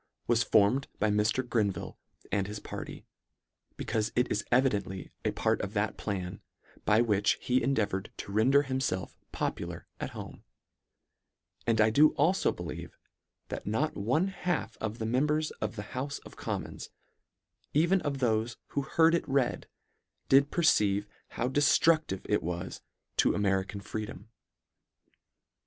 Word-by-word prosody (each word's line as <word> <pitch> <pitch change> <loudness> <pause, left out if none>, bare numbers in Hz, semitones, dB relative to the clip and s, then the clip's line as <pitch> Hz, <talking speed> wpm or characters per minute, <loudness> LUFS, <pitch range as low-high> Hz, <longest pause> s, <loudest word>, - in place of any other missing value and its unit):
was 120 -1 +3
formed 110 +5 +3
by 105 0 +2
Mr. 105 +5 +1
Grenville 105 -7 -1 0.4
and 95 -1 +1
his 105 0 -5
party, - - -7 0.7
becaufe 110 -1 -1
it 125 +1 +2
is 105 - 0
evidently 105 -7 +1
a - - +2
part - - +1
of - - -5
that - - 0
plan, 90 -3 -4 0.4
by 110 +2 +5
which 105 -3 +2
he 125 +1 +1
endeavoured 105 -8 0
to - - -7
render 130 +7 +4
himfelf 130 -9 -2 0.2
popular - - -3
at - - -3
home; - - -8 1.2
and 115 -1 +2
I 110 0 +5
do 150 +7 +5
alfo 175 +6 +3
believe 85 -2 -7 0.5
that - - -5
not 130 +9 0
one 130 - +1
half 180 -4 -2
of 110 +1 -4
the 110 - -3
members 150 +6 +1
of - - -2
the 105 - -5
houfe 140 +3 -3
of - - -12
commons, - - -5 0.9
even 175 +5 +4
of 140 -1 -2
thofe 115 -2 0
who 140 - -1
heard 160 +4 +3
it 170 -3 0
read, 135 -2 +1 0.6
did 140 +1 +6
perceive 105 - +3 0.2
how 120 - -2
deftruclive 145 - +3
it - - +2
was 85 +2 -4 0.4
to - - +4
American 100 0 0
freedom. 105 0 -6
115 Hz, 140 wpm, -30 LUFS, 105-140 Hz, 1.2 s, did